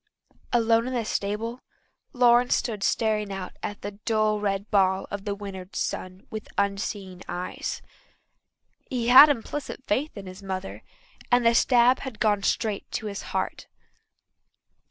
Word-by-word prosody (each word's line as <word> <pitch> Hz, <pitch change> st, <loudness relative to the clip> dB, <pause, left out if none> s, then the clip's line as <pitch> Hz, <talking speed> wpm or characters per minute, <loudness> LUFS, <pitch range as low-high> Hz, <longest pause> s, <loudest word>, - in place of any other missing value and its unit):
Alone 230 Hz, 0 st, +3 dB
in 255 Hz, -, -3 dB
the 235 Hz, -2 st, -1 dB
stable 215 Hz, +4 st, -2 dB, 0.5 s
Lawrence 245 Hz, -2 st, +4 dB
stood 220 Hz, -4 st, -2 dB
staring 215 Hz, -1 st, +1 dB
out 195 Hz, -1 st, -6 dB
at 205 Hz, -, -6 dB
the 205 Hz, -, -4 dB
dull 215 Hz, -1 st, +1 dB
red 200 Hz, 0 st, -2 dB
ball 190 Hz, -2 st, +3 dB
of 205 Hz, -1 st, -5 dB
the 205 Hz, -1 st, -2 dB
winter 195 Hz, -2 st, -8 dB
sun 185 Hz, +5 st, -4 dB
with 215 Hz, 0 st, -6 dB
unseeing 200 Hz, -2 st, -2 dB
eyes. 180 Hz, +1 st, -4 dB, 1.1 s
He 245 Hz, -3 st, -1 dB
had 265 Hz, +4 st, +10 dB
implicit 280 Hz, +1 st, -3 dB
faith 265 Hz, +5 st, -1 dB
in 200 Hz, -, -7 dB
his 185 Hz, +1 st, -10 dB
mother, 190 Hz, -1 st, -5 dB, 0.5 s
and 245 Hz, -1 st, +4 dB
the 230 Hz, -, +6 dB
stab 245 Hz, +1 st, +4 dB
had 260 Hz, -5 st, -7 dB
gone 210 Hz, -2 st, +2 dB
straight 210 Hz, 0 st, -1 dB
to 220 Hz, -, -3 dB
his 200 Hz, -2 st, -4 dB
heart. -, -, -4 dB
210 Hz, 145 wpm, -26 LUFS, 195-235 Hz, 1.1 s, had